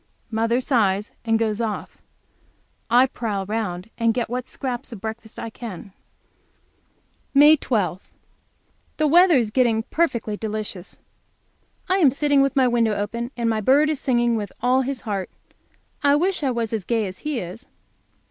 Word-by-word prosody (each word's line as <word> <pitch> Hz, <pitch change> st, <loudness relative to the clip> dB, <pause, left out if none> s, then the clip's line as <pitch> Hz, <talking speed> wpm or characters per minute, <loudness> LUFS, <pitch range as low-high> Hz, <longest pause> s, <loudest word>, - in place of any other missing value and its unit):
Mother 230 Hz, +2 st, +1 dB
sighs 210 Hz, -6 st, +1 dB
and 225 Hz, -1 st, +2 dB
goes 220 Hz, -1 st, -1 dB
off. 220 Hz, -3 st, -4 dB, 0.9 s
I 245 Hz, +3 st, +6 dB
prowl 210 Hz, -6 st, -3 dB
round 205 Hz, -2 st, -4 dB
and 230 Hz, -1 st, +2 dB
get 240 Hz, -3 st, -1 dB
what 250 Hz, 0 st, -3 dB
scraps 255 Hz, 0 st, -5 dB
of 225 Hz, -, -8 dB
breakfast 220 Hz, +1 st, -7 dB
I 230 Hz, -, -6 dB
can. 205 Hz, -5 st, -9 dB, 1.4 s
May 295 Hz, +2 st, +8 dB
12. 200 Hz, -, -2 dB, 0.9 s
The 310 Hz, -, +2 dB
weather 345 Hz, +3 st, +6 dB
is 230 Hz, -5 st, +1 dB
getting 230 Hz, -3 st, +2 dB
perfectly 235 Hz, -10 st, 0 dB
delicious. 210 Hz, -3 st, -5 dB, 0.9 s
I 375 Hz, -, +2 dB
am 305 Hz, -7 st, +6 dB
sitting 285 Hz, +1 st, +2 dB
with 275 Hz, +1 st, +1 dB
my 260 Hz, -2 st, +4 dB
window 230 Hz, -3 st, +2 dB
open, 235 Hz, +4 st, -3 dB
and 235 Hz, -1 st, 0 dB
my 220 Hz, -1 st, 0 dB
bird 285 Hz, +7 st, +4 dB
is 300 Hz, -, -3 dB
singing 240 Hz, -3 st, +1 dB
with 205 Hz, -3 st, -4 dB
all 250 Hz, +2 st, +3 dB
his 265 Hz, -1 st, -3 dB
heart. 200 Hz, -4 st, -3 dB, 0.7 s
I 285 Hz, -1 st, +4 dB
wish 360 Hz, +4 st, +1 dB
I 275 Hz, -, +1 dB
was 235 Hz, -3 st, -2 dB
as 215 Hz, -3 st, -2 dB
gay 225 Hz, +2 st, 0 dB
as 185 Hz, -1 st, -7 dB
he 300 Hz, -4 st, -3 dB
is. 185 Hz, +7 st, -8 dB
235 Hz, 160 wpm, -23 LUFS, 215-265 Hz, 1.4 s, May